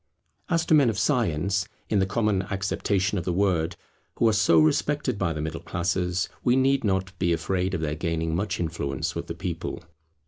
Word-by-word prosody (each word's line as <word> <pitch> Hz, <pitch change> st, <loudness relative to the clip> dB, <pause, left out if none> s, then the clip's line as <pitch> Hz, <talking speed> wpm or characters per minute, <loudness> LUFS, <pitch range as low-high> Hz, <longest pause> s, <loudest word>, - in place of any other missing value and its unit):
As 165 Hz, -2 st, +1 dB
to -, -, +2 dB
men 140 Hz, -5 st, +6 dB
of 110 Hz, -, -2 dB
science, 100 Hz, -, +1 dB, 0.2 s
in 105 Hz, -, +2 dB
the 95 Hz, -, +2 dB
common 105 Hz, -1 st, +1 dB
acceptation 100 Hz, 0 st, 0 dB
of -, -, -4 dB
the 90 Hz, -, -1 dB
word, 90 Hz, -3 st, +1 dB, 0.4 s
who 115 Hz, -, +3 dB
are 110 Hz, -, +4 dB
so 105 Hz, -6 st, +4 dB
respected 125 Hz, -, +1 dB
by 90 Hz, -4 st, +1 dB
the 75 Hz, -1 st, -3 dB
middle 80 Hz, +1 st, -4 dB
classes, 90 Hz, +1 st, -1 dB, 0.2 s
we 125 Hz, 0 st, +4 dB
need 135 Hz, +1 st, +3 dB
not 95 Hz, -2 st, 0 dB
be 90 Hz, -2 st, +2 dB
afraid 90 Hz, +3 st, -1 dB
of 85 Hz, -, -3 dB
their 75 Hz, -2 st, -1 dB
gaining 80 Hz, 0 st, -2 dB
much 100 Hz, +2 st, -2 dB
influence 80 Hz, -1 st, -2 dB
with 85 Hz, 0 st, -5 dB
the 85 Hz, -, -5 dB
people. 85 Hz, -1 st, -4 dB
95 Hz, 195 wpm, -26 LUFS, 85-105 Hz, 0.4 s, men